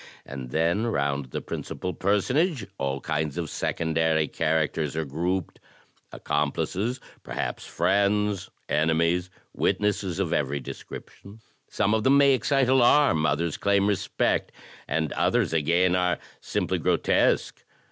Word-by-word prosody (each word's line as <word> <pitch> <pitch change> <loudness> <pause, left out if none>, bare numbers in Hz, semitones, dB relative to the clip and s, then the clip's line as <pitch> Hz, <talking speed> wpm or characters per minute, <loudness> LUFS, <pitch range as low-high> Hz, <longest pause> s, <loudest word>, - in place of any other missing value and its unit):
And 65 -2 -7
then 85 - +1
round 70 - -1
the 65 - -5
principal 90 - -5
personage 125 - +1
all 70 0 -2
kinds 75 -1 -2
of 85 -3 -3
secondary 80 -1 0
characters 80 -1 -1
are 80 0 -1
grouped 85 +5 -2 0.3
— - - -39
accomplices, 90 - -2 0.2
perhaps - - -4
friends, 100 +2 +1 0.2
enemies, 85 +3 +1 0.2
witnesses 100 -3 0
of 90 -4 -1
every 70 -1 0
description. 100 - -10 0.3
Some 105 0 +1
of 110 -1 +1
them 135 +3 +5
may 140 -1 +6
excite 130 +1 +2
alarm, 125 - +4
others 80 +3 -1
claim 100 -1 +2
respect, 100 -3 0 0.4
and 80 -2 -1
others - - +1
again 85 +3 +2
are 90 -1 +1 0.2
simply - - -2
grotesque. - - +1
85 Hz, 125 wpm, -26 LUFS, 80-105 Hz, 0.4 s, may